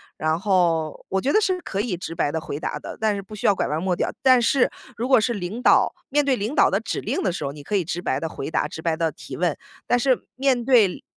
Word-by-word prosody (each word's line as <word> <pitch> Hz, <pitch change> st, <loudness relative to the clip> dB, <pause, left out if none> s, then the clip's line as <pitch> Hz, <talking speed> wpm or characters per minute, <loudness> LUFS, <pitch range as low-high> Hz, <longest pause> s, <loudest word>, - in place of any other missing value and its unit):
然 155 Hz, +1 st, 0 dB
后 170 Hz, -5 st, +1 dB
我 190 Hz, -, +1 dB
觉 270 Hz, +8 st, 0 dB
得 430 Hz, -, +5 dB
是 375 Hz, -3 st, +1 dB
可 195 Hz, -, -2 dB
以 205 Hz, -6 st, -2 dB
直 165 Hz, -1 st, -6 dB
白 145 Hz, -, 0 dB
地 160 Hz, -, -2 dB
回 150 Hz, -, -5 dB
答 155 Hz, -, -4 dB
的， -, -, -8 dB
但 220 Hz, -1 st, +1 dB
是 200 Hz, -, -4 dB
不 205 Hz, +2 st, -11 dB
需 210 Hz, -, -6 dB
要 205 Hz, -, +6 dB
拐 -, -, -1 dB
弯 155 Hz, +4 st, -2 dB
抹 185 Hz, -1 st, +1 dB
角。 -, -, -1 dB
但 255 Hz, -2 st, +6 dB
是 245 Hz, +2 st, +3 dB, 0.2 s
如 230 Hz, -, -3 dB
果 260 Hz, -3 st, +6 dB
是 235 Hz, +3 st, 0 dB
领 205 Hz, +3 st, -5 dB
导， -, -, +4 dB
面 295 Hz, +1 st, +2 dB
对 270 Hz, -3 st, +1 dB
领 220 Hz, +7 st, -3 dB
导 -, -, +5 dB
的 -, -, +1 dB
指 -, -, -4 dB
令 -, -, -2 dB
的 -, -, +1 dB
时 170 Hz, -, -4 dB
候， 140 Hz, -, -2 dB
你 145 Hz, +1 st, -10 dB
可 205 Hz, +8 st, -3 dB
以 190 Hz, -, +2 dB
直 170 Hz, +2 st, -4 dB
白 135 Hz, -5 st, -1 dB
地 160 Hz, -, -2 dB
回 135 Hz, -, -6 dB
答， -, -, 0 dB
直 160 Hz, -, -8 dB
白 165 Hz, -1 st, 0 dB
地 165 Hz, -1 st, 0 dB
提 -, -, -9 dB
问。 -, -, 0 dB, 0.3 s
但 245 Hz, -, +2 dB
是 255 Hz, +1 st, +1 dB
面 260 Hz, -2 st, +2 dB
对 230 Hz, -7 st, +3 dB
200 Hz, 305 characters per minute, -23 LUFS, 165-245 Hz, 0.3 s, 要